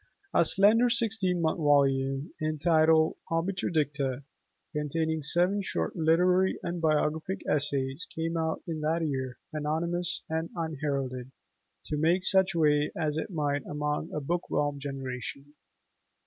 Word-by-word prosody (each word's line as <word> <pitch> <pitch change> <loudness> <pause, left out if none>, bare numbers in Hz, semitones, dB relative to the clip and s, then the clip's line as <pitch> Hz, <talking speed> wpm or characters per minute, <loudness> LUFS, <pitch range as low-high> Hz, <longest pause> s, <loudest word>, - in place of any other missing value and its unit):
A - - +5
slender 210 +7 +5
16mo 195 -8 +1
volume 140 -1 +2
entitled 160 0 +3
"Obiter 175 +3 -1
Dicta", 140 -4 -1 0.5
containing 160 +1 -1
seven 180 +7 +2
short 190 - -3
literary 180 +3 +3
and 175 0 -3
biographic 155 +3 0
essays, 140 0 -1
came 165 +1 -3
out 160 -1 -1
in 160 -3 -4
that 160 +2 0
year, 130 -3 -3 0.2
anonymous 165 +3 -1
and 160 +1 -2
unheralded, 140 -6 -3 0.5
to 150 - -3
make 170 +5 +2
such 190 -2 +3
way 150 -2 +3
as 155 -3 -1
it 160 - -3
might 145 -5 -1
among 150 +2 -2
a - - -2
book 170 +5 -3
whelmed 145 -1 -1
generation. 135 +1 -6
155 Hz, 125 wpm, -28 LUFS, 145-170 Hz, 0.5 s, A